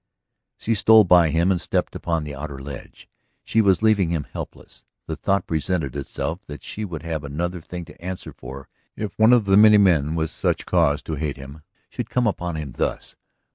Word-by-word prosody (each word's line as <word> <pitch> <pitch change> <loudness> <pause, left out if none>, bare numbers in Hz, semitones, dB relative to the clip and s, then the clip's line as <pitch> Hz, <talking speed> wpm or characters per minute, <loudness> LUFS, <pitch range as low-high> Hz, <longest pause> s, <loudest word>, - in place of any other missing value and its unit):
She 115 - -1
stole 110 +1 +6
by 90 -3 +5
him 85 +5 +2
and 90 - 0
stepped - - -1
upon 85 -2 -2
the 75 -1 -6
outer 70 0 -6
ledge. 65 -1 -10 0.4
She 110 - +2
was 100 0 +3
leaving 105 -6 +3
him 80 -3 -1
helpless... - - -10 0.2
the - - -4
thought 100 -1 0
presented 80 -3 -2
itself 80 +6 -4
that 75 0 -9
she 110 - -6
would 85 -6 -6
have 80 -3 -3
another 85 +5 -3
thing 90 +1 -7
to - - -16
answer 95 0 -6
for 65 +2 -10 0.3
if 105 -1 -4
one 110 +2 +6
of 120 -4 +5
the 100 0 +4
many 105 0 +8
men 80 -6 +3
with 80 -1 -1
such - - -1
cause 75 -5 +2
to 80 - -5
hate 75 -3 -2
him 70 +3 -11 0.3
should - - -6
come 125 -1 +1
upon 90 -5 -2
him 75 -4 -5
thus. - - -3
85 Hz, 200 wpm, -23 LUFS, 75-100 Hz, 0.4 s, many